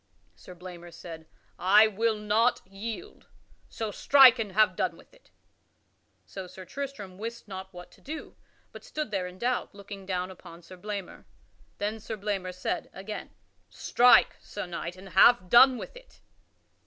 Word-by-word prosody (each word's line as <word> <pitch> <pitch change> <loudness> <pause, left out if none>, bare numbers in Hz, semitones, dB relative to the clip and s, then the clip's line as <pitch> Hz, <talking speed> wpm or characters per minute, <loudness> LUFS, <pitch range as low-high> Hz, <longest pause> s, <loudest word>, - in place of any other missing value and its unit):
Sir 90 - -13
Blamor 175 -1 -10
said, 160 -1 -10 0.3
"I 205 +4 +6
will 220 +1 0
not 210 +3 +1
yield, 220 - -8 0.4
so 220 -2 -4
strike 260 0 +7
and 210 -4 -3
have 210 -2 +4
done - - -1
with - - -20
it." - - -24 1.0
So 190 -2 -8
Sir 185 +1 -11
Tristram 210 -5 -7
wist 230 +1 -6
not 190 -1 -8
what 175 -1 -12
to - - -21
do, 310 +3 -8 0.4
but - - -12
stood 305 -6 -5
there 190 -3 -1
in 180 0 -11
doubt 245 -1 -2
looking 200 -1 -10
down 185 -1 -2
upon 170 -2 -13
Sir 185 - -12
Blamor. 200 0 -7 0.5
Then 210 +2 -3
Sir 220 +1 -6
Blamor 195 -3 -3
said, 180 0 -4
again: 195 +3 -7 0.4
"Strike, 245 +1 +4
Sir 205 - -6
Knight, 170 0 -6
and 190 +1 -12
have 190 0 +5
done 255 +2 +8
with - - -8
it." - - -16
200 Hz, 160 wpm, -28 LUFS, 185-230 Hz, 1.0 s, done